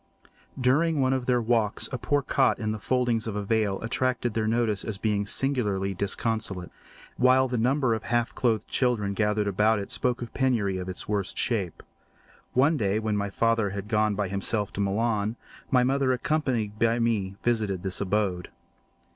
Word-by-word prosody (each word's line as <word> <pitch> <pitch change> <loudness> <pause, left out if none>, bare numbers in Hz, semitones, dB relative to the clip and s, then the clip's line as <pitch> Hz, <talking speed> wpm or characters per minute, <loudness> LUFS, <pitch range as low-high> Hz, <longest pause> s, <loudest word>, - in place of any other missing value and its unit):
During 150 +5 +2
one 130 -1 +2
of 130 -2 -2
their 125 -1 +3
walks 110 -2 +1
a 130 - -3
poor 145 +3 0
cot 135 0 +2
in 110 -2 -2
the 110 - -4
foldings 120 -1 0
of 110 - -3
a 105 - -2
vale 105 -2 0
attracted 120 0 0
their 110 -1 0
notice 110 -3 0
as 110 -3 -4
being 105 -1 -1
singularly 105 -7 0
disconsolate, 100 -1 -2 0.5
while 130 +1 +4
the 125 -2 -2
number 130 +1 +2
of 110 - -2
half 120 -1 0
clothed 110 -4 0
children 115 -6 +1
gathered 105 0 +1
about 105 +3 +2
it 100 - -5
spoke 125 -1 0
of 120 - -9
penury 115 -8 +1
in 90 0 -5
its 90 - -3
worst 100 -4 -2
shape. 100 -8 -1 0.7
One 145 +5 +3
day, 100 -4 +1
when 110 -1 -1
my 100 0 -1
father 115 0 +1
had 100 +1 -6
gone 105 -1 +1
by 100 -1 -1
himself 100 +2 -2
to 100 - -2
Milan, 105 +2 0 0.3
my 125 -2 +4
mother, 135 +1 +2
accompanied 125 -6 -1
by 115 0 +3
me, 110 -5 0
visited 105 -6 0
this 95 0 -2
abode. 100 -3 -1
110 Hz, 180 wpm, -26 LUFS, 100-125 Hz, 0.7 s, while